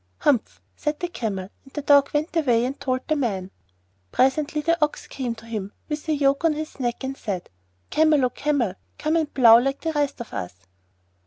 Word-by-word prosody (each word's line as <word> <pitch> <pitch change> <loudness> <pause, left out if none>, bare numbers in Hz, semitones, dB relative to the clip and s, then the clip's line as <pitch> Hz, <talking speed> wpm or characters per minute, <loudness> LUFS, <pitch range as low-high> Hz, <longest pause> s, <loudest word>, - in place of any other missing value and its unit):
'Humph!' 255 -6 +1 0.2
said 300 0 -2
the 350 - -1
Camel; 195 - -4
and 270 - -19
the 295 - -4
Dog 285 -1 +5
went 305 +3 -1
away 245 -7 +3
and 270 +3 -4
told 255 -1 -1
the 310 - +2
Man. 195 -9 -2 0.6
Presently 290 +4 +2
the 335 +1 +2
Ox 300 - -1
came 245 -4 -4
to 225 - -14
him, 210 -3 -5 0.2
with 300 +1 -4
the 310 - +2
yoke 280 +1 +2
on 325 -2 +4
his 305 -1 -6
neck 240 0 -2
and 265 +1 -3
said, 200 -9 -5 0.4
'Camel, 305 -4 +4
O 250 - 0
Camel, 280 -10 0 0.2
come 310 +2 0
and 315 -3 +1
plough 235 -3 +8
like 275 +3 -1
the 325 -1 -2
rest 290 -2 0
of 235 - -8
us. 90 0 -4
275 Hz, 200 wpm, -24 LUFS, 235-300 Hz, 0.6 s, plough